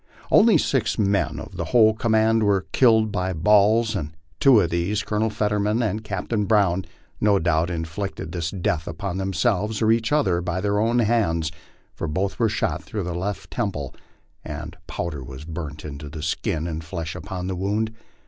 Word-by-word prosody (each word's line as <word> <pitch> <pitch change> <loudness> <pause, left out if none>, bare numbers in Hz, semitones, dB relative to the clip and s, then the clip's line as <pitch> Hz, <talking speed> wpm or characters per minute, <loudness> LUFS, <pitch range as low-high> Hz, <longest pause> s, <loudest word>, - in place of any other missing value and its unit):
Only 215 -4 +6
six 125 -6 0
men 100 -2 +1
of - - -9
the - - -2
whole 110 -3 +5
command 110 0 +2
were 100 -3 +2
killed 110 -4 +4
by 95 -2 -1
balls, 105 +5 +4
and 80 -4 -4 0.3
two 135 -5 +6
of 90 -4 +1
these, 90 +5 0
Colonel 110 +1 0
Fetterman 105 +1 0
and 110 0 -2
Captain 105 +1 -2
Brown, 95 -4 +2 0.3
no 105 -1 +4
doubt 85 -2 +1
in 80 -2 -2
flicted 80 -1 -5
this 85 -2 -2
death 85 -4 -2
upon 90 +2 -4
themselves, 100 +2 0
or 110 -1 +3
each 115 0 +1
other, 95 -13 +2
by 90 +1 -2
their 100 +1 0
own 115 +3 +2
hands, 100 -9 +1 0.4
for 85 - -4
both 95 +8 -2
were 115 -2 +3
shot - - -1
through 105 -3 -4
the 90 0 -3
left 95 +4 -4
temple, 95 - -3 0.5
and 75 +2 -7
powder 80 -4 -4
was 65 +4 -9
burnt 75 -2 -6
into 75 0 -7
the 75 0 -7
skin 80 0 -1
and 80 -1 -4
flesh 80 0 -5
about 95 -3 -5
the 95 0 -2
wound. 105 +4 -1
100 Hz, 180 wpm, -23 LUFS, 85-110 Hz, 0.5 s, Only